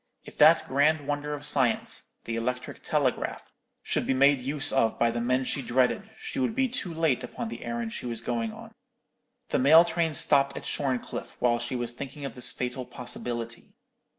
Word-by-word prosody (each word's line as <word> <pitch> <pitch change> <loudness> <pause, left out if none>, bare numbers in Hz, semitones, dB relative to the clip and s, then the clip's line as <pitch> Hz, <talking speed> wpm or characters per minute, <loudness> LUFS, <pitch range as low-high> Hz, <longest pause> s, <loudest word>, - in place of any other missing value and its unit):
If - - -13
that - - +6
grand 145 +2 +2
wonder 145 0 -2
of 145 0 -7
science, 130 -5 +1
the 115 - -4
electric 125 +2 -3
telegraph, - - -1 0.3
should - - -1
be 135 - +2
made 140 +1 +5
use 140 +3 +1
of 115 -5 +2
by 115 0 +2
the 120 0 -2
men 125 +2 +1
she 135 - -1
dreaded, 130 - +1
she - - -5
would 250 -4 0
be 265 0 +2
too 240 -8 -3
late 160 -5 +1
upon 115 - -5
the 115 +1 -7
errand 115 -1 -3
she - - -5
was 115 -2 -4
going 115 -2 -2
on. - - -12 0.8
The - - +1
mail 160 +6 +7
train 165 -2 -1
stopped 140 0 +3
at - - -7
Shorncliffe 130 -3 -3
while 120 -1 +2
she 120 +2 -3
was 120 -1 -2
thinking 140 +3 -7
of 135 - -5
this 125 - -3
fatal 125 +1 -4
possibility. 120 -1 -4
130 Hz, 190 wpm, -27 LUFS, 120-145 Hz, 0.8 s, mail